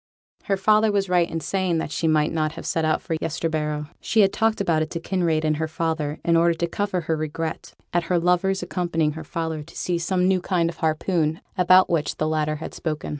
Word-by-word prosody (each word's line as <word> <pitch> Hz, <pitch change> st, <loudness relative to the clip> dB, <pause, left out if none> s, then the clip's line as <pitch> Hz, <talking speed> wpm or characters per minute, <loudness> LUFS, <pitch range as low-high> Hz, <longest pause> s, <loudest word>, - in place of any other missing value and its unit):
Her 195 Hz, -, +1 dB
father 215 Hz, +2 st, +4 dB
was 200 Hz, -2 st, 0 dB
right 175 Hz, -2 st, +3 dB
in 165 Hz, -, -3 dB
saying 185 Hz, +1 st, 0 dB
that 160 Hz, -, -3 dB
she 165 Hz, -, -1 dB
might 155 Hz, -1 st, +2 dB
not 155 Hz, -1 st, 0 dB
have -, -, -9 dB
set 165 Hz, -, 0 dB
out 155 Hz, 0 st, +1 dB
for 165 Hz, -, -2 dB
Yesterbarrow. 155 Hz, -2 st, -2 dB
She 220 Hz, -, +2 dB
had 195 Hz, -1 st, +3 dB
talked 225 Hz, 0 st, +1 dB
about 170 Hz, -5 st, +1 dB
it 155 Hz, -, -2 dB
to 170 Hz, -, -4 dB
Kinraid 165 Hz, -3 st, 0 dB
and 155 Hz, -1 st, +1 dB
her 160 Hz, +1 st, -1 dB
father 155 Hz, -2 st, -2 dB
in 170 Hz, -, +3 dB
order 170 Hz, 0 st, +4 dB
to 170 Hz, -, -1 dB
cover 185 Hz, +1 st, -2 dB
her 160 Hz, 0 st, -1 dB
regret 155 Hz, +1 st, -4 dB, 0.2 s
at 175 Hz, 0 st, +1 dB
her 180 Hz, +1 st, +1 dB
lover's 180 Hz, +2 st, +1 dB
accompanying 170 Hz, -3 st, 0 dB
her 160 Hz, +1 st, -7 dB
father 160 Hz, -1 st, -3 dB
to 150 Hz, -, -13 dB
see 175 Hz, -1 st, -1 dB
some 180 Hz, +2 st, +1 dB
new 185 Hz, -1 st, +2 dB
kind 170 Hz, -3 st, 0 dB
of 170 Hz, -, -17 dB
harpoon 160 Hz, 0 st, 0 dB, 0.2 s
about 185 Hz, 0 st, +5 dB
which 160 Hz, -4 st, 0 dB
the 155 Hz, -, 0 dB
latter 155 Hz, -1 st, 0 dB
had 155 Hz, -, -7 dB
spoken. 155 Hz, -2 st, -4 dB
165 Hz, 225 wpm, -23 LUFS, 155-180 Hz, 0.2 s, about